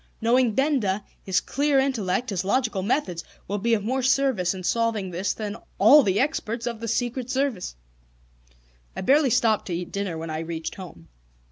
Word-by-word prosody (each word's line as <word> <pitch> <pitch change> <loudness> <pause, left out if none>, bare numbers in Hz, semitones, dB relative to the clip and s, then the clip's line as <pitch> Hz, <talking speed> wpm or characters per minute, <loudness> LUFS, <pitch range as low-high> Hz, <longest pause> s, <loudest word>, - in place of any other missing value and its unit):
Knowing 235 -1 +2
Benda, 235 -8 +1 0.2
his 190 -2 +1
clear 285 0 0
intellect, 250 -4 0
his 190 -2 -1
logical 220 -1 0
methods, 185 - -1 0.2
will 205 +2 -2
be 230 +3 +2
of 205 - -3
more 260 +5 -1
service 255 -9 +2
in 185 - -7
solving 220 -1 0
this 180 +3 -1
than 210 -1 -4 0.2
all 295 +1 +8
the 200 -5 +1
experts 240 -5 -1
of 235 -2 -3
the 230 - -5
Secret 245 +2 -2
Service." 260 - -1 1.2
I - - -4
barely 275 +7 +4
stopped 230 -3 +2
to 175 - -2
eat 175 0 -5
dinner 200 -4 -3
when 160 0 -5
I 155 - -3
reached 165 0 -5
home. 170 - -11
220 Hz, 175 wpm, -25 LUFS, 185-255 Hz, 1.2 s, all